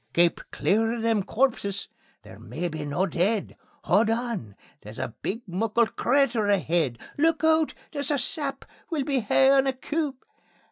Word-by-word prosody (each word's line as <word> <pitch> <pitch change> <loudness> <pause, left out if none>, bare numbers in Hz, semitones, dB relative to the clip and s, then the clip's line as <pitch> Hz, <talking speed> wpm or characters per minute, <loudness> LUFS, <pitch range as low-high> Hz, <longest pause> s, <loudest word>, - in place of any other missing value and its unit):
"Keep 170 0 +3
clear 225 +3 +1
o' 240 - -4
them 225 -2 +1
corpses 200 -3 -1 0.4
they're - - -13
maybe 155 -4 -4
no 145 +6 0
deid! 195 +3 0 0.3
Haud 215 +5 +3
on! 225 - -2 0.3
There's 105 +2 -11
a - - -4
big 230 +5 -3
muckle 215 +5 +1
crater 240 -3 +1
aheid. 170 -10 +1 0.2
Look 325 +1 +2
oot! 320 -1 +3 0.2
There's 285 -2 -2
a 290 - +2
sap; 275 +2 -1 0.2
we'll 315 -5 -1
be 275 -1 0
haein' 270 +4 +4
a 265 - +1
coup. 295 +2 -2
225 Hz, 150 wpm, -26 LUFS, 190-275 Hz, 0.4 s, haein